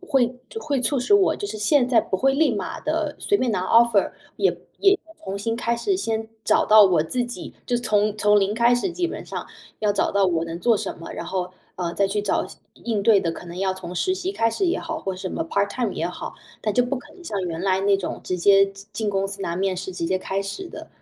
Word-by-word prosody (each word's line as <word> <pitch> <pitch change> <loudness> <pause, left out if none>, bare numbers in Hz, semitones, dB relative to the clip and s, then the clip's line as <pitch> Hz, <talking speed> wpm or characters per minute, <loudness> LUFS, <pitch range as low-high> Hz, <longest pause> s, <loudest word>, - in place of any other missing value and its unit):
会 265 -9 +1 0.3
会 280 -4 -1
促 265 +3 +1
使 250 - 0
我 400 -2 +5
就 - - -6
是 215 +1 -6
现 245 +4 +3
在 240 -3 +5
不 190 - -2
会 270 +6 +3
立 310 +3 +2
马 - - -4
地 - - -1
随 405 - +2
便 255 - 0
拿 185 -2 0
offer， 230 -3 +4 0.2
也 - - +2 0.2
也 395 0 +5 0.3
重 195 - -4
新 225 +3 -1
开 235 0 0
始 380 - 0
先 225 - -2 0.2
找 - - +3
到 215 -1 +8
我 175 -5 +3
自 245 +9 -1
己， 240 - -7
就 245 - +1
从 215 -3 +1
从 210 0 +4
零 200 +2 +1
开 235 +1 +4
始 295 +10 0
基 350 0 0
本 - - -6
上， - - -5 0.4
要 210 -1 +2
找 200 - +1
到 200 -1 +3
我 170 -3 +1
能 165 0 -5
做 230 +1 +4
什 - - -4
么， 165 - -8
然 - - -6
后， 180 -1 -2 0.3
呃， 175 -2 -2
再 200 +2 +2
去 205 +1 -1
找 205 - 0
相 - - -14 0.2
应 220 -4 0
对 205 -2 +5
的 165 -3 -1
可 - - -9
能 170 +2 -8
要 190 -1 0
从 180 -1 -7
实 370 - +1
习 380 0 -3
开 230 - +2
始 300 - -1
也 345 - +1
好， 320 -1 -4
或 190 -1 -4
什 185 0 -4
么 - - -2
part 200 0 +1
time 235 -6 -1
也 170 - -2
好， 180 - -6 0.3
但 215 - -1
就 245 +3 +3
不 270 +2 -2
可 255 - -11
能 360 - -15
像 205 - -3
原 170 -2 -3
来 190 0 +1
那 200 0 +3
种 195 - -5
直 185 - -2
接 195 +2 +6
进 195 +1 -12
进 215 0 -1
公 195 0 0
司 195 0 -5
拿 170 -1 -2
面 190 -1 0
试， 190 - -5
直 170 -2 -3
接 185 - +1
开 195 +1 -2
始 345 - -5
的。 - - -10
210 Hz, 310 characters per minute, -23 LUFS, 190-245 Hz, 0.4 s, 到